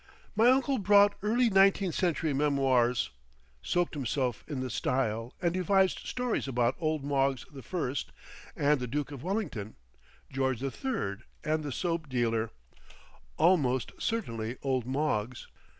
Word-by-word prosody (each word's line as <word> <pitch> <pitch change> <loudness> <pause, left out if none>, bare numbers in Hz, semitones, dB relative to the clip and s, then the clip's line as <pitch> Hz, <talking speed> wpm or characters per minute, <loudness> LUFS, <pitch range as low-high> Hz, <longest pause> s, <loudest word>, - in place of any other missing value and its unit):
My 225 +3 +5
uncle 265 0 +3
brought 205 +1 +5
early 230 +3 +2
nineteenth 195 -2 +4
century 165 -4 0
memoirs, 135 - +2 0.5
soaked 175 - 0
himself 130 -3 -2
in 145 -4 -4
the 130 -1 -3
style, 115 -2 -1
and 170 -1 +2
devised 190 +1 +2
stories 250 - -1
about 120 -1 +1
old 155 -3 -1
Moggs 135 -2 0
the 140 -2 -9
First 145 -5 -3 0.4
and 145 0 +2
the 125 - -3
Duke 145 +4 -3
of 140 -4 -7
Wellington, 165 - -3 0.6
George 130 -3 0
the 135 +1 -2
Third 120 - -3 0.2
and 155 0 0
the 145 - -4
soap 165 +1 -2
dealer 115 -3 0 0.9
("almost 145 -8 +3
certainly 115 - -2
old 130 -3 0
Moggs"). 130 -4 -1
140 Hz, 135 wpm, -30 LUFS, 125-185 Hz, 0.9 s, My